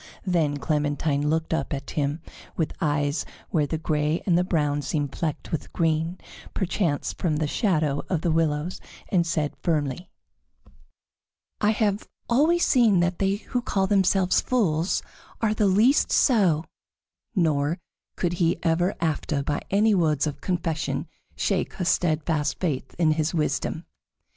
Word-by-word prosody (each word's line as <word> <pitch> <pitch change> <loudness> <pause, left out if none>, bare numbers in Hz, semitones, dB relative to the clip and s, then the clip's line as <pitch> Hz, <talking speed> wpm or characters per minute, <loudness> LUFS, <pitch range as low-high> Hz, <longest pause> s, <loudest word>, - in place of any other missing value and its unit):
Then 160 -6 +1
Clementine 145 0 0
looked 160 +1 0
up 145 -2 -1
at 135 0 -7
him 150 +2 -2 0.3
with 160 - -1
eyes 145 -1 0 0.3
where 150 -3 +2
the 160 - -2
gray 155 0 0
and 180 - +3
the 175 - +3
brown 150 -5 0
seemed 145 -1 -2
flecked 155 -3 -3
with 155 -3 -3
green, 165 +2 0 0.4
perchance 175 -5 -1
from 165 -4 -1
the 155 +1 0
shadow 155 - +1
of 175 -5 0
the 170 - +1
willows, 160 +1 0 0.3
and 175 -3 +2
said 155 -3 -1
firmly: 155 0 -1 1.5
"I 210 - +3
have 210 -2 0 0.2
always 315 +8 +3
seen 225 -7 +4
that 175 0 0
they 195 0 +2
who 245 +4 -3
call 195 -5 0
themselves 190 -2 +3
fools 180 -9 +1 0.4
are 220 -2 +1
the 210 -1 +2
least 220 +9 +4
so," 185 - +3 0.7
nor 155 -3 +1 0.4
could 175 -1 -1
he 165 0 +3
ever 175 +3 +1
after 155 -3 -1
by 145 +1 -1
any 210 +2 +3
words 155 -6 +2
of 150 -2 -4
confession 165 -3 -2 0.3
shake - - -1
her 180 - -3
steadfast 160 -3 +1
faith 140 -7 -2
in 165 -2 +3
his 155 +2 0
wisdom. 155 -2 -1
165 Hz, 145 wpm, -25 LUFS, 150-185 Hz, 1.5 s, seen